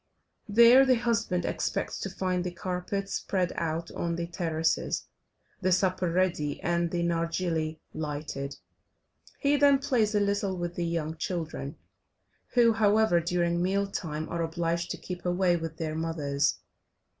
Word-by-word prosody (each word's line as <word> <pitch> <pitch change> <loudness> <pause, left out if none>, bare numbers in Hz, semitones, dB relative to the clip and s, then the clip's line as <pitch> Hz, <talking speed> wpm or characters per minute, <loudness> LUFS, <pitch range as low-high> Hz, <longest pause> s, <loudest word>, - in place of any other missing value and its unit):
There 235 +5 +8
the 260 -1 +4
husband 230 -7 0
expects - - -2
to 195 - -3
find 185 -1 -1
the 180 - -2
carpets 185 +3 -3
spread 185 -3 -1
out 165 0 -2
on 170 -1 -2
the 170 0 -2
terraces, 165 -2 -1 0.6
the 185 - +2
supper 185 -1 +2
ready, 170 -5 0
and 170 0 +1
the 170 0 -1
nargilly 165 -2 -1
lighted, 145 -2 -4 0.8
he 285 +1 +2
then 280 -1 +6
plays 240 -6 +1
a - - +4
little 200 -1 0
with 175 0 -3
the 175 -1 -2
young 160 -1 -2
children, 160 -5 -4 0.8
who, 235 -2 +6
however, 215 -3 +4
during 170 0 0
meal 195 +2 +1
time 160 -6 -4
are 170 - -2
obliged 170 +1 -1
to - - -3
keep 180 -1 -7
away 180 0 +2
with 165 -1 -4
their 160 -1 -3
mothers. 150 -3 0
175 Hz, 145 wpm, -28 LUFS, 165-195 Hz, 0.8 s, There